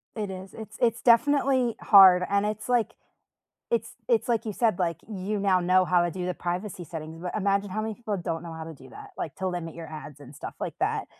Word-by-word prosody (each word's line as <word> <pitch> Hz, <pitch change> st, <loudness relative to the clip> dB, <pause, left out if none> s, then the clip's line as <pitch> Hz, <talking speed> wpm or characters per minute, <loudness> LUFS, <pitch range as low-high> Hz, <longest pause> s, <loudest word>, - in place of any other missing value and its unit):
It 210 Hz, -3 st, -3 dB
is. 185 Hz, 0 st, -9 dB
It's 220 Hz, 0 st, -10 dB
it's 235 Hz, -1 st, +2 dB
definitely 260 Hz, 0 st, +3 dB
hard 185 Hz, -3 st, +8 dB
and 200 Hz, +1 st, +2 dB
it's 215 Hz, +1 st, -3 dB
like 240 Hz, -3 st, +2 dB, 0.8 s
it's 470 Hz, -, -1 dB
it's 460 Hz, -, +1 dB
like 230 Hz, -1 st, +1 dB
you 215 Hz, -, -3 dB
said, 220 Hz, -5 st, +1 dB
like, 170 Hz, -3 st, 0 dB
you 200 Hz, +1 st, -3 dB
now 190 Hz, -2 st, +3 dB
know 185 Hz, +1 st, +4 dB
how 175 Hz, -1 st, +3 dB
to 175 Hz, -, -1 dB
do 180 Hz, 0 st, -4 dB
the 180 Hz, -, -1 dB
privacy 180 Hz, +1 st, -4 dB
settings 160 Hz, +1 st, -8 dB
but 180 Hz, -, -4 dB
imagine 200 Hz, -1 st, +1 dB
how 215 Hz, +3 st, -2 dB
many 220 Hz, -1 st, -3 dB
people 220 Hz, -4 st, -3 dB
don't 170 Hz, -1 st, -4 dB
know 165 Hz, -1 st, -7 dB
how 160 Hz, 0 st, -6 dB
to 160 Hz, 0 st, -8 dB
do -, -, -15 dB
that, 415 Hz, -1 st, -11 dB
like, 155 Hz, -, -5 dB
to 190 Hz, -, -3 dB
limit 170 Hz, -3 st, -4 dB
your 165 Hz, -1 st, -8 dB
ads 150 Hz, -2 st, -9 dB
and 140 Hz, +1 st, -12 dB
stuff -, -, -7 dB
like -, -, -4 dB
that. -, -, 0 dB
190 Hz, 235 wpm, -27 LUFS, 175-220 Hz, 0.8 s, hard